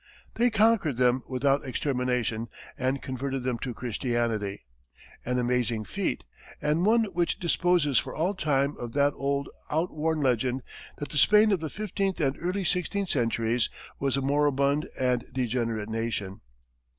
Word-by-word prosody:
They 240 +1 +3
conquered 215 - +3
them 125 0 +3
without 135 +2 +1
extermination, 125 -4 -1 0.3
and 130 +1 -1
converted 135 0 -3
them 125 -2 -1
to 125 - -3
Christianity! 115 - -2 0.6
An 125 +1 -1
amazing 120 -3 0
feat, 195 - -2 0.4
and 155 +5 +1
one 230 +1 +5
which 175 0 0
disposes 170 -5 +2
for - - -6
all 175 +6 +1
time 145 -6 +1
of 120 -1 -6
that 145 0 +3
old, 140 0 -1 0.2
outworn 160 0 0
legend 125 0 +1 0.3
that 145 - -5
the 150 - 0
Spain 210 +7 +6
of 195 - +2
the 160 -1 -4
fifteenth 195 -1 -2
and 140 -3 +1
early 185 +3 -1
sixteenth 180 +2 -1
centuries 115 -2 +1 0.3
was 135 -1 +1
a 135 - -1
moribund 140 +1 +2
and 125 -2 +1
degenerate 115 -4 -1
nation. 110 -4 -3
135 Hz, 145 wpm, -27 LUFS, 125-160 Hz, 0.6 s, Spain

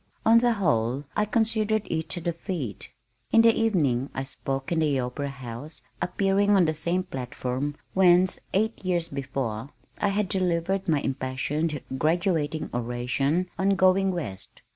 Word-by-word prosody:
On 230 +1 +7
the 240 0 +3
whole 130 - +1
I 210 - +2
considered 220 -1 +1
it 160 -1 -2
a - - -4
defeat. 165 - -4 0.4
In 225 - +6
the 230 0 +6
evening 145 - +1
I 135 - -2
spoke 135 +1 -4
in 165 - +2
the 150 -4 +2
Opera 130 +3 -3
House 135 +3 -8 0.2
appearing 195 +2 +2
on 185 -3 +5
the 155 - +1
same 170 +4 -1
platform 130 -2 -4 0.2
whence, 185 -1 +4
eight 220 +3 0
years 175 -3 0
before, 130 -4 -3 0.3
I 205 - +2
had 200 0 0
delivered 185 0 0
my 155 -4 +2
impassioned 140 +4 -2 0.2
graduating 160 -1 0
oration 125 +8 -1
on 195 +1 +3
"Going 190 +1 +4
West." 150 - -6
165 Hz, 145 wpm, -26 LUFS, 135-190 Hz, 0.4 s, On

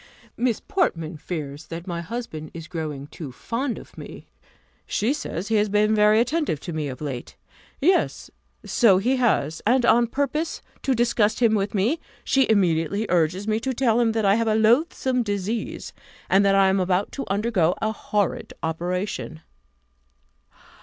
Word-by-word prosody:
"Miss 240 -2 0
Portman 165 - -1
fears 150 -2 -6
that 165 +1 -7
my 170 -2 -4
husband 170 -6 -6
is 165 -1 -7
growing 155 -5 -5
too 145 -1 -8
fond 235 - -3
of - - -13
me: - - -10 0.6
she 225 +7 +1
says, 205 - -5
he 220 - +3
has 210 0 +2
been 210 +1 +3
very 210 0 +5
attentive 250 - 0
to 175 - -6
me 155 -2 -2
of 130 0 -7
late. 135 -5 -5 0.4
Yes, 360 +6 +1 0.3
so 215 -6 +4
he 250 +7 +1
has; 165 - +1
and 245 +2 +3
on 235 0 +4
purpose 285 +6 -2 0.2
to 265 - +1
disgust 230 -2 +2
him 230 -3 +4
with 205 0 0
me, 230 - +1 0.2
she 270 -1 +2
immediately 195 0 +2
urges 180 +3 +1
me 215 0 +1
to 260 +2 -3
tell 235 -2 +2
him 230 -2 +2
that 220 -2 0
I 195 - +5
have 230 +2 +1
a 215 - +2
loathsome 250 +3 +2
disease, 205 +1 -3 0.4
and 195 +1 +5
that 195 0 +4
I 195 -1 +5
am 190 +1 +2
about 185 +2 0
to 275 - -5
undergo 195 -4 +1
a 220 - 0
horrid 205 -3 -2
operation. 175 0 -3
210 Hz, 165 wpm, -24 LUFS, 170-235 Hz, 0.6 s, very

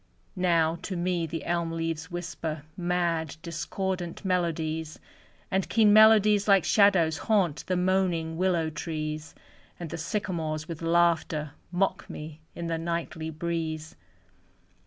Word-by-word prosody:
Now, 170 -3 +2
to 185 - -4
me 175 -1 0
the 165 +1 -5
elm 170 -1 0
leaves 165 0 -3
whisper 165 -3 -5
Mad, 175 -3 -1
discordant 180 +2 -4
melodies, 160 -3 -1 0.5
And 190 -1 0
keen 215 -3 +5
melodies 215 -1 +6
like 195 -3 +6
shadows 185 -6 +4
Haunt 190 -9 +1
the 185 - +1
moaning 180 -3 +1
willow 170 -3 +1
trees, 155 0 -4 0.4
And 170 -4 -6
the - - -5
sycamores 160 -4 -2
with 165 -2 -6
laughter 165 -3 +2 0.2
Mock 190 +2 0
me 155 +1 -8
in 170 - -5
the 165 -1 -1
nightly 165 -1 -3
breeze. 160 -1 -3
170 Hz, 125 wpm, -27 LUFS, 160-185 Hz, 0.5 s, melodies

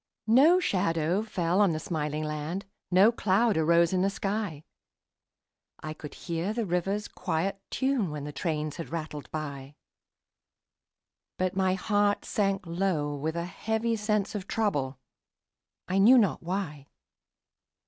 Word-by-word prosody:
No 280 +11 +6
shadow 180 - +1
fell 185 -3 0
on 195 -5 +4
the 155 - -2
smiling 155 -2 -2
land, 155 +5 -4 0.2
No 190 +5 +6
cloud 215 0 +2
arose 170 +2 +3
in 185 - +2
the 195 - +3
sky; 195 -6 -3 1.2
I 155 0 -4
could 150 -1 -10
hear 170 +4 -3
the 230 -1 -1
river's 195 +3 -1
quiet 185 +3 -2
tune 265 -8 0
When 150 -1 -5
the 150 - -5
trains 155 -1 -2
had 165 - -6
rattled 155 -3 -5
by; 145 -2 -6 1.6
But 185 0 -1
my 190 -1 +2
heart 205 +1 +1
sank 195 -2 0
low 165 -4 -1
with 155 +3 -3
a 170 0 -2
heavy 220 +5 -1
sense 210 -1 0
Of 200 -3 -5
trouble, 145 - -1 0.9
I 190 +1 +1
knew 235 +6 +8
not 205 -8 +2
why. 165 -6 -4
185 Hz, 140 wpm, -28 LUFS, 155-205 Hz, 1.6 s, knew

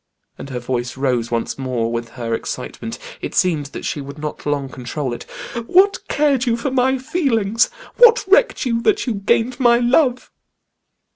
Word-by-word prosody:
and 140 - -9
her 130 - -4
voice 125 +1 -3
rose 125 -4 0
once 115 +3 -2
more 125 -3 -1
with 115 0 -3
her 115 -2 -3
excitement; - - -5 0.2
it - - -5
seemed 160 -6 +1
that - - -8
she 145 - -2
would 140 +1 -9
not 150 0 -6
long 145 -2 -1
control 130 +1 -4
it. 120 - -8 0.4
"What 390 +3 +4
cared 280 -4 +1
you 230 -1 +2
for 245 +3 -2
my 265 +1 +2
feelings? 235 - +1 0.3
What 480 0 +6
recked 405 - +3
you 230 -2 0
that 410 - +2
you 245 - -1
gained 225 +5 0
my 240 -2 +5
love?" 250 +1 +2
200 Hz, 170 wpm, -20 LUFS, -, 0.4 s, What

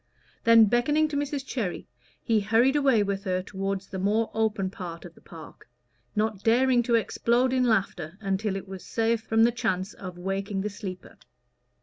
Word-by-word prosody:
Then, 230 -1 +8
beckoning 295 +8 +2
to 295 - -4
Mrs 285 -1 -2
Cherry, 220 -10 -3 0.4
he 225 -3 +2
hurried 225 +7 +3
away 270 -7 +3
with 200 -1 -3
her 185 -1 -1
toward 195 0 -3
the 195 0 -7
more 215 +4 +1
open 215 -4 0
part 170 -3 -8
of 170 - -11
the - - -20
park, 165 -6 -13 0.5
not 210 -2 -1
daring 245 +2 +4
to 235 0 +1
explode 240 +3 +1
in 255 -1 +2
laughter 195 -6 -1
until 195 0 -1
it 195 0 -6
was 190 -1 -8
safe 225 0 0
from 225 0 +2
the 235 - +5
chance 210 -5 -2
of 180 -2 -9
waking 195 +2 -3
the 210 +1 -3
sleeper. 190 -3 -8
215 Hz, 180 wpm, -26 LUFS, 195-235 Hz, 0.5 s, Then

